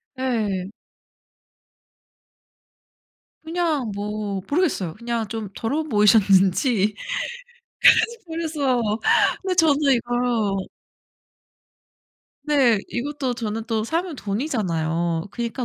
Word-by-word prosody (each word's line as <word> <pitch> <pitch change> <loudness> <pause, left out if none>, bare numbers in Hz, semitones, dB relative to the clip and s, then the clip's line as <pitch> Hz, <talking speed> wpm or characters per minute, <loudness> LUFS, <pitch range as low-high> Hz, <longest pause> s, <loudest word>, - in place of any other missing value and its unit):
네. 215 -8 -1 2.7
그냥 320 -7 -1
뭐 205 -1 -3
모르겠어요. 285 - 0
그냥 235 0 -3
좀 220 0 -5
더러워 280 +8 -1
보이셨는지 210 - +3 1.3
그래서 310 -6 -1 0.6
근데 375 -1 -1
저도 300 -4 +3
이거 240 -4 0 1.9
네. 270 -7 +3
이것도 265 0 -3
저는 225 -1 -3
또 220 -2 -1
사면 330 +5 -2
돈이잖아요. 175 - -1
그니까 235 +3 -4
235 Hz, 175 characters per minute, -23 LUFS, 205-285 Hz, 2.7 s, 보이셨는지